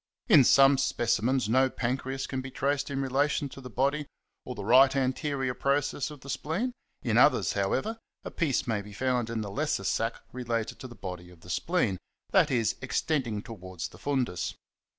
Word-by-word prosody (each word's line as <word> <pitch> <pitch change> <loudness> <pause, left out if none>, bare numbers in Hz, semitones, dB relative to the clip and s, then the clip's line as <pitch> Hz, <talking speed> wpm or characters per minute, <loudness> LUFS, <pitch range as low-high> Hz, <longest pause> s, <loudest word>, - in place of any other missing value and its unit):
In 155 - +8
some 135 +2 +6
specimens 125 -2 +1
no 130 +4 +3
pancreas 130 +2 -2
can 130 -1 -3
be 130 - -7
traced 140 +2 -1
in 135 -1 -2
relation 140 +2 0
to 135 - -11
the 125 - -9
body 140 +5 0 0.4
or 125 - -6
the 100 - -6
right 130 +5 +6
ant. 130 -1 0 0.4
process 140 +1 0
of 150 -3 -11
the 140 - -11
spleen; 205 +12 -2 0.3
in - - +2
others, - - +4
however, 225 +1 -1 0.2
a - - -6
piece 150 -7 0
may 110 -4 -1
be 105 0 -11
found 125 0 0
in 115 -1 -2
the 100 -2 -5
lesser 155 +7 -1
sac 115 +1 0 0.2
related 120 -3 -3
to 130 - -7
the 120 - -12
body 90 -3 -7
of 90 -2 -17
the 90 - -8
spleen, 120 - 0 0.3
i.e., 145 - +4 0.2
extending 130 -5 -1
towards 95 -6 -7
the 90 - -15
fundus. 125 -7 -1
130 Hz, 180 wpm, -28 LUFS, 115-140 Hz, 0.4 s, In